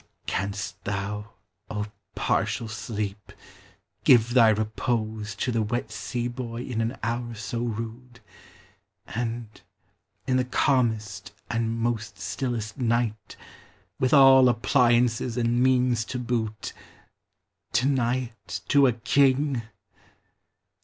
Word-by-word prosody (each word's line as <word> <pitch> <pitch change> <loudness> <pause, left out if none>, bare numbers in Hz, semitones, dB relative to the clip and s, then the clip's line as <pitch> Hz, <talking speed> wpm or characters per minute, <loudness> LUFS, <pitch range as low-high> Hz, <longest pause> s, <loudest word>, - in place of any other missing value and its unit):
Canst 100 0 -3
thou, 105 +1 -4 0.4
O 105 0 -2 0.3
partial 115 - 0
sleep! 105 -2 -5 0.7
give 120 -1 +5
thy 115 -3 +7
repose 110 -1 -1
To 115 +6 -1
the 115 -1 +1
wet 110 +1 -2
sea 120 +3 -3
boy 120 -1 -5
in 115 -3 -2
an 115 +4 -2
hour 120 +1 -2
so 110 +2 -4
rude; 120 +1 -5 0.9
And 115 -2 -5 0.6
in 130 - +2
the 130 - +2
calmest 110 -8 0 0.2
and 115 0 -1
most 115 -1 -2
stillest 120 -2 -3
night, 115 -3 -1 0.6
With 130 - +2
all 135 -3 +8
appliances 120 -1 +2
and 120 0 +2
means 125 -2 +3
to 125 - -4
boot, 115 -4 -3 1.0
Deny 125 -1 +1
it - - -4
to 140 -1 +6
a 125 - +2
king? 135 +3 +2
115 Hz, 110 wpm, -26 LUFS, 110-125 Hz, 1.0 s, all